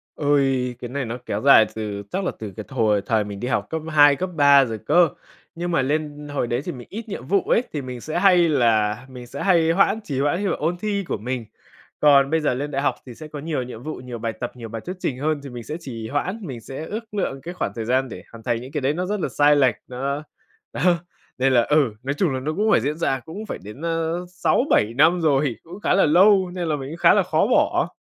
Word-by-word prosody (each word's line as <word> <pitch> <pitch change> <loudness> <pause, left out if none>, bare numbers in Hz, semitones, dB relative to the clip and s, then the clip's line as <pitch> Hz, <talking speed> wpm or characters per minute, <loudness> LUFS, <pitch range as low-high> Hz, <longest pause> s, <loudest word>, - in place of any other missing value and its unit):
Ôi, 135 -4 +1
cái 120 - -6
này 140 0 -3
nó 115 +2 -4
kéo 105 - -3
dài 135 -5 +7
từ 105 -2 -4
chắc 195 - -1
là - - -1
từ 105 -4 -7
cái 110 - -6
thời 110 -6 +1
thời 110 -2 +1
mình 100 -1 -7
đi 125 - -3
học 130 - -1
cấp 160 -1 -3
2, 145 -2 +6
cấp 185 +4 -3
3 140 -2 +6
rồi 110 -2 -4
cơ. 175 -3 +5 0.5
Nhưng 175 +1 -3
mà 135 - +2
lên 150 +1 -2
hồi 130 - -1
đấy 120 +2 -1
thì 175 - -3
mình 125 -3 -10
ít 220 +2 -7
nhiệm 125 - -6
vụ 200 +2 +3
ấy, 235 - +2
thì 145 - -2
mình 125 -2 -7
sẽ 155 - -2
hay 180 -4 +5
là 110 -6 +2
mình 125 -2 -10
sẽ 140 - -6
hay 170 -4 +4
hoãn 195 +4 +2
trì 140 -8 -3
hoãn 145 +6 +1
như 200 - +1
là - - 0
ôn 170 +4 -1
thi 200 0 -2
của - - -2
mình. 120 +2 -4 0.5
Còn 140 -2 +5
bây 160 +1 +1
giờ 150 - +1
lên 145 +4 -4
đại 135 0 -1
học - - +1
thì 120 -3 -10
sẽ 155 - -9
có 150 -1 -8
nhiều 150 -3 -2
nhiệm 120 -1 -9
vụ, 155 - -5
nhiều 125 -1 -8
bài 115 0 -3
tập, 120 +1 -5
nhiều 115 -2 -8
bài 115 0 -6
thuyết 180 - -5
trình 130 - -2
hơn, 150 +2 -1
thì 140 - -7
mình 120 -1 -8
sẽ 150 - -5
trì 115 -8 -7
hoãn, 180 +10 -2
mình 135 - -7
sẽ 135 +7 -7
ước 220 +4 -7
lượng 135 -9 -2
cái 175 +4 -7
khoảng - - -3
thời 115 -2 -4
gian 130 +2 +1
để 90 - -9
hoàn 115 -1 -12
thành 115 -1 -1
những 130 +2 -10
cái 150 -2 -2
đấy, 135 +3 +1
nó 180 +3 -2
rất 210 +2 -2
là - - -2
sai 145 0 +4
lệch. 135 -3 +3
Nó 140 +4 -3 0.5
đó, - - -4 0.6
nên 130 +1 +2
là 120 -2 +5
ừ, 145 -5 +2
nói 140 +2 -1
chung 160 -6 +1
là 130 - -2
nó 150 +4 -3
cũng 215 +2 +1
phải - - +4
diễn 150 +4 -2
ra, 135 -5 0
cũng 165 - -8
phải - - -5
đến, 105 +9 -10
a, - - 0 0.4
6-7 180 - +1
năm 165 +4 +4
rồi. 140 -5 +2
Cũng 175 +4 -11
khá 205 - +1
là 195 - +4
lâu, 185 +3 +5
nên 180 -2 -3
là 155 - +1
mình 135 -2 -6
cũng 165 - -7
khá - - +6
là - - +3
khó - - +1
bỏ. - - +2
140 Hz, 270 wpm, -22 LUFS, 125-165 Hz, 0.6 s, dài